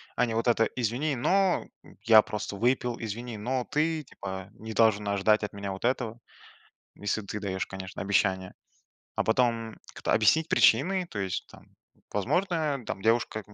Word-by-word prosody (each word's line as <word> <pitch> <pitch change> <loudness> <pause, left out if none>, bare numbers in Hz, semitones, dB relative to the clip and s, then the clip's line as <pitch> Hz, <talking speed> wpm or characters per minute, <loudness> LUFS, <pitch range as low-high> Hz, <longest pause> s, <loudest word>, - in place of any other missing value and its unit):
а 125 - +3
не 115 - -3
вот 115 +2 0
это: 115 -1 +4
"Извини, 125 +5 -1
но 190 +9 +2 0.4
я 110 -1 +8
просто 105 -1 -5
выпил". 120 +2 +1
"Извини, 115 +1 -5
но 125 +4 -2
ты, 155 +1 0
типа, 95 -7 -7
не 110 +1 -8
должен 105 -1 +3
ожидать 100 +2 +2
от 105 - -4
меня 100 -1 -5
вот 95 - -7
этого". 120 -2 -1 0.8
Если 105 +2 -2
ты 105 +1 -5
даешь, 95 -2 -3
конечно, 95 -1 -7
обещание, 95 -1 +1 0.6
а - - +1
потом 115 -1 +1 0.2
кто - - -3
объяснить 155 +9 +4
причины, 185 +5 +4
то 105 - -6
есть 95 -2 -2
там, - - -16 0.5
возможно, 150 - 0
там 95 - -5
девушка, 115 0 +1
там, 105 - -18
115 Hz, 165 wpm, -28 LUFS, 100-125 Hz, 0.8 s, я